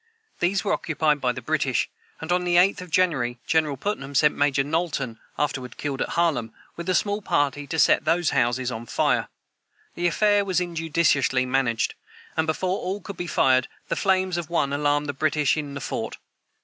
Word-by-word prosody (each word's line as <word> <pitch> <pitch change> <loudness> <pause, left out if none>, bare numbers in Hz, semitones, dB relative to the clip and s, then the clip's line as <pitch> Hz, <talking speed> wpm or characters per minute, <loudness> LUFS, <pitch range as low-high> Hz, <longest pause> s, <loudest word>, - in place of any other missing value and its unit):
These 180 +2 +1
were - - +1
occupied 155 -2 0
by 125 - +2
the - - -7
British; - - 0 0.3
and, 160 +2 -5
on 180 0 +2
the 175 -1 +1
8th 180 +2 +4
of 180 - -9
January, 145 -9 +1
General 155 -3 +1
Putnam 140 -5 -4
sent 150 +2 +4
Major 145 -1 +2
Knowlton 145 -6 -2 0.2
(afterward 130 -4 -2
killed 140 -3 -3
at - - -2
Harlem), 150 -10 +1 0.2
with 170 +1 -5
a 185 - +2
small 205 +3 0
party, 145 -5 0
to 160 - -3
set - - +4
those 165 +1 +2
houses 120 +1 +1
on 115 0 -6
fire. - - +1 0.7
The 175 0 0
affair 205 +3 +3
was 185 -2 0
injudiciously 160 -6 +1
managed, 125 -3 0 0.4
and, 160 0 0
before 185 +4 -1
all 190 +3 -3
could 200 0 -8
be 175 - -4
fired, 130 -5 +3 0.2
the - - 0
flames 185 -2 +1
of 170 -2 -4
one 140 -5 0
alarmed 145 0 +1
the 145 - -3
British 150 0 +1
in 145 -2 -4
the - - -4
fort. - - -4
155 Hz, 190 wpm, -24 LUFS, 135-175 Hz, 0.7 s, 8th